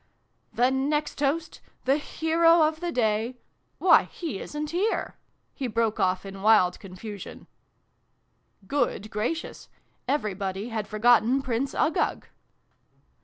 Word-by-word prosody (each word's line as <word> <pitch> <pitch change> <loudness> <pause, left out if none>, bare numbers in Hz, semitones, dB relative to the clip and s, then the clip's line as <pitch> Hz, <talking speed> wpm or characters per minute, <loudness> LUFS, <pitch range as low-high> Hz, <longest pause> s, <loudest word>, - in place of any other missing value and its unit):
" - - -45
The 250 +2 +3
next 290 +3 -1
toast 305 +3 -1 0.2
the 270 +2 +3
hero 330 +2 +3
of 310 0 +1
the 350 0 -3
day 225 -1 0 0.4
why, - - +5
he 315 - -6
isn't 300 0 -5
here! 385 +6 -1 0.2
" - - -46
he 265 - -3
broke 230 -1 0
off 185 +1 +1
in 195 0 -8
wild 200 -4 +4
confusion. 195 +1 -9 1.2
Good 215 -4 -1
gracious! 240 +11 -4 0.4
Everybody 200 -5 -2
had 220 -3 -3
forgotten 240 +4 +3
Prince 255 +2 -2
Uggug 315 - 0
245 Hz, 120 wpm, -26 LUFS, 210-300 Hz, 1.2 s, why